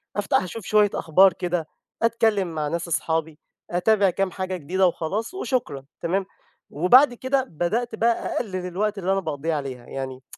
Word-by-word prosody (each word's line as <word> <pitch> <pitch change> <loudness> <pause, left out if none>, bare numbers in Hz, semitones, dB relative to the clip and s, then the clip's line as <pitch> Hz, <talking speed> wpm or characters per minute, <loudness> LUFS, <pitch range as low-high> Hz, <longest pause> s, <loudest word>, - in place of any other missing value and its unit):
أفتح 205 -2 +1
اشوف 185 +3 -7
شوية 210 -1 +4
أخبار 185 +3 +4
كده، 175 -3 -2 0.3
أتكلَّم 225 -4 +2
مع 150 -1 -1
ناس 170 +3 -3
أصحابي، 160 -1 -1 0.3
أتابع 195 +3 +3
كام 195 +1 -1
حاجة 185 0 -3
جديدة 185 +4 +1
وخلاص، 200 - -3
وشكرًا، 235 - -2 0.2
تمام؟ 185 +3 0 0.4
وبعد 245 - +5
كده، 260 +2 0
بدأت 220 - -2
بقى 230 +1 0
أقلِّل 185 -5 -3
الوقت 205 +3 -1
اللي 190 0 -1
أنا 195 - +2
باقضِّيه 160 -1 -3
عليها، 130 -4 -5
يعني، 130 -1 -6
185 Hz, 155 wpm, -24 LUFS, 160-215 Hz, 0.4 s, وبعد